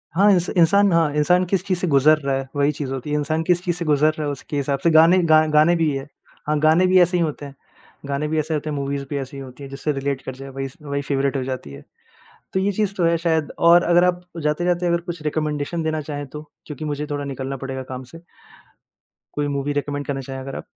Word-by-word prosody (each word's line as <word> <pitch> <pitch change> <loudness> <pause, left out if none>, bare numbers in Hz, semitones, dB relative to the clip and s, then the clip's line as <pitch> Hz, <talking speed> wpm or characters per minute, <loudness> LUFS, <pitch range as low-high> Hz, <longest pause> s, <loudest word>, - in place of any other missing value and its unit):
हाँ 200 +4 +5
इंस 180 -2 +2
इंसान 200 +4 +4
हाँ 165 -3 +3
इंसान 180 +5 +3
किस 185 +1 0
चीज़ 185 -3 0
से 180 - -1
गुज़र 150 +1 +5
रहा 140 -2 -1
है 135 0 -3
वही 145 +1 +2
चीज़ 140 -2 -5
होती 135 +2 -5
है। 150 - 0
इंसान 155 +2 -1
किस 175 0 +2
चीज़ 175 -2 -1
से 170 - -4
गुज़र 150 0 +3
रहा 155 -1 -4
है 145 - -1
उसके 145 +1 -6
हिसाब 140 0 -1
से 170 - +4
गाने 165 +3 +6
गा 155 -1 +5
गाने 155 +3 +4
भी 165 -3 +1
ये 135 - -2
है। 135 - -10 0.4
हाँ 150 0 +1
गाने 160 +4 +4
भी 185 0 +5
ऐसे 180 +1 +3
ही 170 - +2
होते 150 -2 -4
हैं 140 -1 -11 0.5
गाने 140 +2 -2
भी 155 +1 0
ऐसे 155 +1 -2
ही - - +2
होते 150 +1 -5
हैं, 150 - -3
मूवीज़ 140 0 -3
भी 145 - -2
ऐसे 135 0 -6
ही - - -6
होती 130 +1 -11
हैं, 135 - -8
जिससे 135 +2 -3
रिलेट 135 -1 -2
कर 130 - -7
जाए 135 +1 -9
वही, 135 0 -5
वही 140 -1 -3
फेवरेट 140 -1 -1
हो 130 - -2
जाती 130 - -5
है। 70 +1 -11 0.7
तो 190 - +1
ये 195 +2 +1
चीज़ 205 0 -1
तो 180 - +1
है 170 0 +3
शायद 160 -2 0
और 170 +1 +6
अगर 175 +1 +4
आप 180 0 +1 0.2
जाते-जाते 175 +4 0
अगर 170 0 +1
कुछ 170 -2 -5
रिकमेंडेशन 150 +1 -2
देना 155 -1 -1
चाहें 145 -1 -5
तो? 150 +3 -8 0.2
क्योंकि 150 0 -7
मुझे 150 0 -3
थोड़ा 145 0 -2
निकलना 135 0 -5
पड़ेगा 135 0 -5
काम 130 0 -6
से। 165 +6 -13 1.1
कोई 145 0 -1
मूवी 140 0 -2
रिकमेंड 145 0 -3
करना 135 -1 -2
चाहें 135 0 -7
अगर 135 +1 -7
आप? - - -7
150 Hz, 260 wpm, -21 LUFS, 140-170 Hz, 1.1 s, गाने